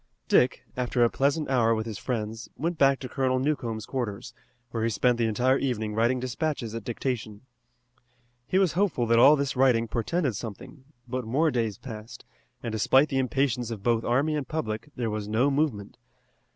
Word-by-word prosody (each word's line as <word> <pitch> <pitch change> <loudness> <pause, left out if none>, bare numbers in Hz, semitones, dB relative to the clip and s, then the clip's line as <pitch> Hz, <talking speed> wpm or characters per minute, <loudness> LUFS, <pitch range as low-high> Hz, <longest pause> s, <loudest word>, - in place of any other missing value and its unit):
Dick, 125 - +3
after 125 -1 +1
a 120 - +3
pleasant 145 +3 +1
hour 115 -4 +3
with 110 0 -3
his 110 -4 -6
friends, 115 -2 -4
went 165 +4 -2
back 135 -1 +5
to 130 - -5
Colonel 130 -1 0
Newcomb's 125 -6 -2
quarters, 120 -2 -4 0.4
where 115 - -2
he 115 - +2
spent 120 +2 +1
the 115 - +2
entire 125 +5 +2
evening 110 -5 -2
writing 120 +4 +2
despatches 130 -2 -3
at 115 -2 -5
dictation. 115 -3 -4 1.1
He 185 - +1
was 190 -4 +3
hopeful 180 -9 +1
that 115 0 +4
all 140 +5 +8
this 140 -1 -2
writing 125 -3 +3
portended 125 - -1
something, 115 +6 -8 0.2
but 130 +1 -3
more 145 +8 +1
days 115 -5 -1
passed, 115 -1 -9 0.4
and 115 - -3
despite 130 +7 +3
the 135 - 0
impatience 130 -2 0
of 110 -4 -6
both 115 -1 +2
army 140 +6 +1
and 145 -3 -3
public, 115 -3 -4
there 120 -4 -2
was 105 -1 -4
no 120 +7 +2
movement. 135 -9 -1
125 Hz, 180 wpm, -27 LUFS, 115-135 Hz, 1.1 s, all